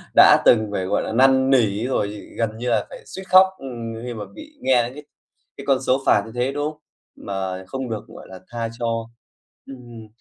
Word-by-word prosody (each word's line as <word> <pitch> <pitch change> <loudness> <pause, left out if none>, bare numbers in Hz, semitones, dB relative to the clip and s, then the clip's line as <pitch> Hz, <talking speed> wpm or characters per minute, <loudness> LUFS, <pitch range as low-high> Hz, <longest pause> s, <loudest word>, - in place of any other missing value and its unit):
đã - - +8
từng 110 -2 +5
phải, 95 -2 -2
gọi - - 0
là, - - -4
năn 130 +2 +4
nỉ 115 -4 +2
rồi 115 -6 0 0.3
gần 110 -1 -1
như 125 +1 -3
là 110 -3 +1
phải - - -10
suýt 190 - -8
khóc 185 +1 +7 0.6
khi 125 -1 -5
mà 105 -2 -6
bị 310 -1 -12
nghe 125 - +3
những 125 - -7
cái 150 +2 -10 0.5
cái 140 - -9
con 135 -2 +3
số 130 +1 +1
phạt - - +4
như 115 - -10
thế, 125 +2 0
đúng 145 +2 -2
không? 150 - -21 0.3
Mà 95 -1 -5
không 130 +1 -5
được, 110 -2 -4
gọi - - -12
là, 95 -1 -10
tha 115 -1 -3
cho. 115 -1 -2 0.6
Ừm, 120 -4 -11
120 Hz, 210 wpm, -22 LUFS, 110-135 Hz, 0.6 s, đã